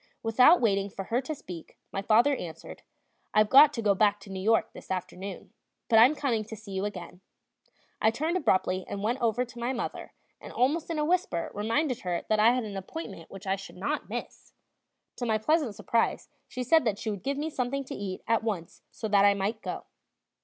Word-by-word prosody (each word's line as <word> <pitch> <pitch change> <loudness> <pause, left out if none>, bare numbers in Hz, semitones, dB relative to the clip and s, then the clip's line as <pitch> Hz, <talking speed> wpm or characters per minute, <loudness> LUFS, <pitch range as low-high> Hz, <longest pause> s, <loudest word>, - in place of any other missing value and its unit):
Without 250 +9 +6
waiting 200 -3 +1
for 195 - -6
her 235 +5 0
to 300 +4 -5
speak, 175 - -10
my 195 - -2
father 235 +8 +4
answered: 165 -7 -8 0.5
"I've 215 0 +4
got 285 +2 +9
to 230 - -3
go 205 -1 +4
back 205 +1 +2
to 195 - -11
New 190 - -4
York 225 +4 +2
this - - -12
afternoon, 190 +1 -5 0.4
but 225 -2 +6
I'm 255 +7 +7
coming 240 -7 0
to 220 +1 -8
see 215 -1 -12
you 190 +1 -2
again." 180 -2 -7 0.8
I 220 - +5
turned 310 +10 -1
abruptly 185 - +1
and 200 0 -5
went 235 +5 -1
over 235 +1 +1
to 240 0 -12
my 240 +2 -1
mother, 245 - -5 0.3
and - - -9
almost 300 +7 +1
in 330 - -2
a 300 - +1
whisper 335 - 0
reminded 235 +6 0
her 175 -2 -2
that 215 - +3
I 220 +2 +6
had 250 -1 -1
an 205 -2 -6
appointment 195 - -7
which 195 +1 -10
I 190 0 +1
should 195 -1 -11
not 285 +11 -3
miss; - - -7 0.6
to 245 - -3
my 220 -1 +2
pleasant 285 -1 +1
surprise 230 +3 0 0.2
she 255 - -4
said 320 +5 +4
that 210 -3 0
she 220 0 -3
would 200 -3 -5
give 275 0 -2
me 310 +2 -3
something 275 0 -2
to 265 - -8
eat 195 -2 -5
at 230 0 +2
once 200 -7 -4
so 225 - -5
that 200 -1 +4
I 200 0 +5
might 205 +3 -2
go. - - -5
220 Hz, 215 wpm, -28 LUFS, 195-255 Hz, 0.8 s, got